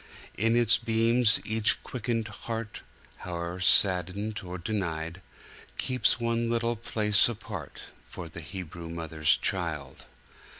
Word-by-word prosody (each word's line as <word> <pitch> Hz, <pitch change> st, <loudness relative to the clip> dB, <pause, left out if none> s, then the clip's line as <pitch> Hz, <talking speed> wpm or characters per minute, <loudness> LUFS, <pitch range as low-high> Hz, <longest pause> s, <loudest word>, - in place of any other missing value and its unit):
In 115 Hz, +2 st, +2 dB
its 120 Hz, -1 st, +5 dB
beams 115 Hz, 0 st, +3 dB
each 110 Hz, 0 st, +2 dB
quickened 115 Hz, -3 st, -2 dB
heart, 110 Hz, 0 st, -5 dB, 0.4 s
Howe'er 85 Hz, 0 st, -5 dB
saddened 95 Hz, +4 st, +3 dB
or 90 Hz, 0 st, -6 dB
denied, 85 Hz, -3 st, -3 dB, 0.6 s
Keeps 125 Hz, -1 st, +1 dB
one 115 Hz, 0 st, 0 dB
little 115 Hz, 0 st, +1 dB
place 105 Hz, -1 st, +3 dB
apart 105 Hz, -8 st, -7 dB, 0.3 s
For 90 Hz, -, -7 dB
the 85 Hz, +1 st, -9 dB
Hebrew 85 Hz, 0 st, -7 dB
mother's 80 Hz, -2 st, +1 dB
Child. 75 Hz, -7 st, -3 dB
105 Hz, 115 wpm, -28 LUFS, 85-115 Hz, 0.6 s, its